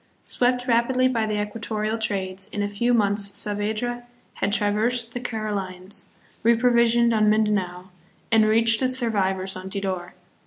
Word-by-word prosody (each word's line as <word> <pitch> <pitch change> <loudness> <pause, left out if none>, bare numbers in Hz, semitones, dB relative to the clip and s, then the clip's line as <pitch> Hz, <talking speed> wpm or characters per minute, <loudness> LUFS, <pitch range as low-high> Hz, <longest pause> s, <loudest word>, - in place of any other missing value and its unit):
Swept 245 0 +1
rapidly 250 +2 +3
by 230 -4 0
the 210 -1 -1
equatorial 215 +1 -3
trades, 190 -2 -2
in 210 -1 -3
a - - 0
few 205 +4 0
months 205 -3 +1
Saavedra 220 +4 -2 0.3
had - - -1
traversed 225 +3 0
the 245 - -3
Carolines, 205 -4 -4 0.3
reprovisioned 235 0 +4
on 215 -1 +3
Mindanao, 190 -4 0 0.4
and 220 -1 +5
reached 225 0 +4
the 255 -1 +1
survivors 195 -6 0
on 185 +1 -7
Tidor. 190 -3 -4
215 Hz, 140 wpm, -24 LUFS, 200-235 Hz, 0.4 s, and